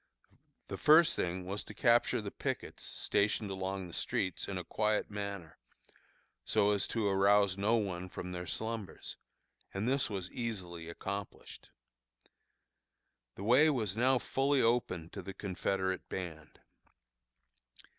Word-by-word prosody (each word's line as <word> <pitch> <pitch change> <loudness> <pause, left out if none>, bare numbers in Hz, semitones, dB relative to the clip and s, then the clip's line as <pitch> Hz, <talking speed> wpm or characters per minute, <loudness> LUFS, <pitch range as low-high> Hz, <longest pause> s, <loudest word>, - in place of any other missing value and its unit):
The - - -5
first 160 +2 +6
thing 90 +1 -2
was 100 +3 -3
to 105 - -11
capture 120 -1 +3
the 100 -1 -5
pickets - - -4
stationed 105 0 0
along 95 0 -3
the 85 - -10
streets 95 -3 -1
in 95 - -3
a 90 - -3
quiet 105 +2 0
manner, 100 -5 -5 0.8
so 100 0 +3
as 100 -2 +1
to 110 -3 0
arouse 100 0 +4
no 105 +4 +2
one 95 -5 -2
from 90 0 -6
their 90 0 -5
slumbers, 110 -1 -4 0.5
and 100 +4 -2
this 135 -1 +2
was 95 -3 -4
easily 90 -8 -5
accomplished. 100 +4 -6 1.7
The 95 - -7
way 130 +8 +6
was 110 -9 0
now 130 +3 +4
fully 135 +2 +1
open 115 -9 +1
to 100 - -6
the 95 +1 -8
Confederate 95 -1 -2
band. 80 -4 -6
100 Hz, 135 wpm, -33 LUFS, 95-110 Hz, 1.7 s, first